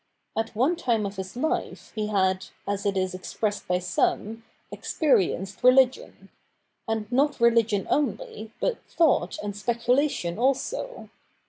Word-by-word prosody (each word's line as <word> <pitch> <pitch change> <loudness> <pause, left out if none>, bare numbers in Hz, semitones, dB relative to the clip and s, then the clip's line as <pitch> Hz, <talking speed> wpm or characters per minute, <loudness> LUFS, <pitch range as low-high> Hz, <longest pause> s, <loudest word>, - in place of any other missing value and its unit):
At 225 0 -2
one 265 +10 +2
time 235 -10 0
of 200 0 -5
his 190 +1 -6
life 310 +6 -2
he 215 -1 -2
had, 190 -2 +1 0.2
as 200 0 -1
it 195 -1 0
is 185 -1 0
expressed 205 +3 -3
by 180 - +2
some, 205 +5 -1 0.3
experienced 195 - 0
religion; 255 0 +3 0.6
and 225 -1 -1
not 285 +3 +2
religion 230 -4 +3
only, 225 -5 -2
but - - -1
thought 305 - +2
and 205 -1 -4
speculation 235 - 0
also. 275 - -1
225 Hz, 130 wpm, -26 LUFS, 195-255 Hz, 0.6 s, religion